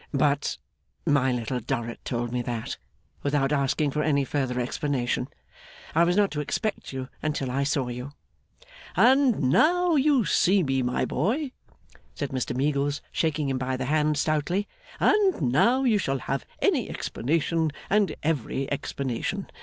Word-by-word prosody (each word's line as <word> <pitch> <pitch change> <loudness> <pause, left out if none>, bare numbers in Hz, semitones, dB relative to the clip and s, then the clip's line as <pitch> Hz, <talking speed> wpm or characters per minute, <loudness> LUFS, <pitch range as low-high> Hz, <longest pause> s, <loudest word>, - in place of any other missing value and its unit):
' - - -36
But 145 0 0 0.5
my 135 -3 +3
Little 125 +1 -2
Dorrit 120 -1 -4
told 120 -1 -2
me 125 0 -1
that, 120 -2 -4 0.4
without 140 -1 +1
asking 140 +1 +1
for 150 - -1
any 140 -2 +2
further 130 -3 -1
explanation, 125 0 -1 0.7
I 170 +2 +5
was 175 +2 +1
not 205 -1 +3
to 150 - -3
expect 215 - -3
you 130 -1 -5
until 145 -4 -2
I 135 +2 0
saw 140 -2 0
you.' 125 +3 -6 0.8
'And 250 - +4
now 345 - +4
you 280 -5 +3
see 190 +1 +3
me, 135 -2 +1
my 125 0 0
boy,' 265 +6 -1 0.6
said 145 - -3
Mr 125 -2 -2
Meagles, 145 +1 0
shaking 155 -3 0
him 130 -1 -1
by 130 0 -1
the 130 - -3
hand 150 +1 +1
stoutly; 155 +7 0 0.3
'and 405 -3 +3
now 160 - +3
you 225 -5 +3
shall 135 -7 0
have 135 0 -3 0.2
any - - +2
explanation 160 +4 0 0.2
and 205 0 +2
every 140 -3 -1
explanation. 140 +7 -3
145 Hz, 155 wpm, -26 LUFS, 130-175 Hz, 0.8 s, I